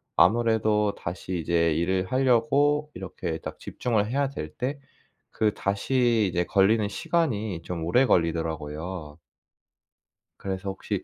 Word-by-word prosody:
아무래도 110 -2 +3
다시 90 +1 -5
이제 85 -1 +2
일을 95 +3 0
하려고 135 +4 +2
이렇게 90 -3 -5
딱 - - -7
집중을 110 -4 -1
해야 140 +2 0
될 75 - -6
때 135 +3 -2 0.5
그 110 -1 +1
다시 115 +2 +1
이제 90 0 0
걸리는 100 +3 +3
시간이 110 - -1
좀 85 -1 -4
오래 120 +11 +4
걸리더라고요. 80 - -1 1.2
그래서 95 0 -4
혹시 95 - -4
100 Hz, 265 characters per minute, -26 LUFS, 85-120 Hz, 1.2 s, 오래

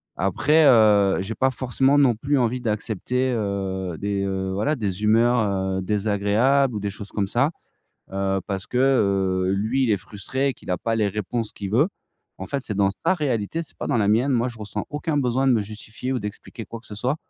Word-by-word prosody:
Après, 145 - +3
heu, 105 -6 +5
j'ai 105 +4 -5
pas 130 - +2
forcément 130 +2 +1
non 135 -5 +4
plus 140 +6 0
envie 125 0 +1
d'accepter, 115 +3 -1
heu, 95 -4 -3
des, 100 -1 -1
heu, 95 -1 -2
voilà 125 +11 0
des 105 -5 -3
humeurs, 115 +3 +4 0.4
heu, - - -2
désagréables 105 +6 +1
ou - - -2
des 100 0 -2
choses 100 +1 -8
comme 100 -2 -1
ça, 140 +9 +1 0.6
heu, 95 0 0
parce 95 -2 -4
que, 125 - -2
heu, 95 -8 +2
lui, 110 +7 +1
il 120 - +1
est 105 - +3
frustré 105 +8 -3
et 135 - -2
qu'il - - -10
a 90 - 0
pas 115 +5 -1
les 105 -2 +2
réponses 105 +2 -3
qu'il 100 -2 -6
veut. 130 - +3 0.5
En 95 - -5
fait, 140 - -2
c'est 105 - -4
dans 100 -1 +3 0.2
sa 175 +3 +4
réalité, 145 - -1
c'est 160 - -14
pas - - -5
dans - - +1
la 105 -3 +2
mienne. 115 +6 +3
Moi, 120 -1 +2
je 115 -2 -9
ressens 105 -1 -4
aucun 150 +1 -2
besoin 130 -1 +1
de - - +5
me 115 - +3
justifier 110 +5 -6
ou 130 - -1
d'expliquer 105 +2 -7
quoi 115 - -8
que - - -14
ce 105 - -8
soit. 125 +7 -1
110 Hz, 220 wpm, -23 LUFS, 100-130 Hz, 0.6 s, heu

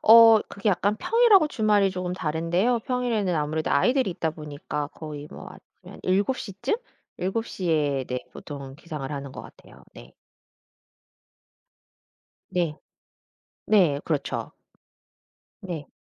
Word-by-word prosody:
어 225 0 +9
그게 200 +1 -2
약간 205 +2 +2
평일하고 445 - +5
주말이 210 -5 +3
쪼금 180 -1 -3
다른데요. 175 +8 0
평일에는 230 -7 0
아무래도 155 +1 -1
아이들이 250 - +3
있다 165 -2 -2
보니까 150 -1 -5
거의 150 -2 -8
뭐 - - -9
아침에 - - -15
한 - - -12
7:00 200 +3 0
쯤? 265 - +2 0.4
7:00에 165 - 0
네 125 0 -3
보통은 140 -3 -8
기상을 150 -4 -6
하는 140 -2 -5
것 - - -7
같아요 - - -16
네. - - -13 2.4
네. 170 -4 0 0.9
네 175 -10 +4
그렇죠. 150 -4 -2 1.1
네. 170 -6 -5
180 Hz, 240 characters per minute, -25 LUFS, 150-215 Hz, 2.4 s, 어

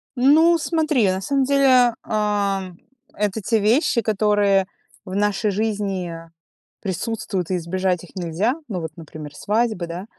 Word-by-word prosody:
Ну, 315 +7 +5
смотри, 310 - +1
на 190 +1 -1
самом 275 +4 +1
деле, 260 -3 +4
ам, 200 -4 -1 0.4
это 210 +1 -1
те 225 +3 +1
вещи, 235 +3 +2
которые 205 -2 +2 0.4
в 185 0 -6
нашей 205 0 +1
жизни 200 -4 -2 0.7
присутствуют, 195 -1 -3
и 180 - +1
избежать 180 +1 -1
их 180 - -15
нельзя. 185 - -1
Ну 185 -6 -4
вот, 160 - -5
например, 155 -2 -9
свадьба, 215 -4 -1
да. 175 +3 -6
205 Hz, 135 wpm, -22 LUFS, 185-230 Hz, 0.7 s, Ну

